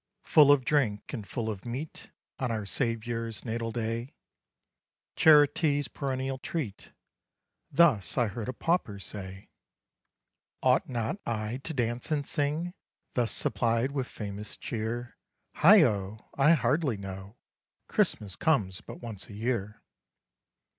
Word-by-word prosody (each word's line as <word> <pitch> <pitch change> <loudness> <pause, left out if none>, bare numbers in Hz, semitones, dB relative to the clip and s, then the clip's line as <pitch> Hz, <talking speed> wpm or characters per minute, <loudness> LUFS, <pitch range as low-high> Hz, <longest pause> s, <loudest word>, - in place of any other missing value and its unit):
Full 145 -2 +7
of 135 -3 +4
drink 125 -9 0
and 110 -7 -5
full 115 -3 -3
of 105 -4 -4
meat, 130 +6 -6 0.3
On 130 - -1
our 110 -3 -2
SAVIOUR'S 115 0 -2
natal 115 0 -2
day, 115 +3 -3 1.0
CHARITY'S 145 -1 +5
perennial 135 -1 -3
treat; 125 - -5 0.8
Thus 135 - +4
I 120 - +4
heard 115 +2 -4
a - - -2
Pauper 165 - 0
say: 95 0 -8 1.1
"Ought 130 +1 +3
not 120 - -2
I 110 +1 -2
to 150 +4 -7
dance 120 +1 -1
and 150 -3 0
sing 155 +5 -1 0.4
Thus 120 -2 +1
supplied 115 +4 0
with 135 -3 -2
famous 105 0 -7
cheer? 120 +2 -4 0.4
Heigho! 110 - +4
I 145 +4 +6
hardly 145 -5 +1
know 95 +1 -8 0.5
Christmas 100 -4 0
comes 105 -13 +1
but - - -10
once 110 -5 -7
a 105 - -9
year. 105 -2 -2
120 Hz, 125 wpm, -29 LUFS, 110-140 Hz, 1.1 s, Full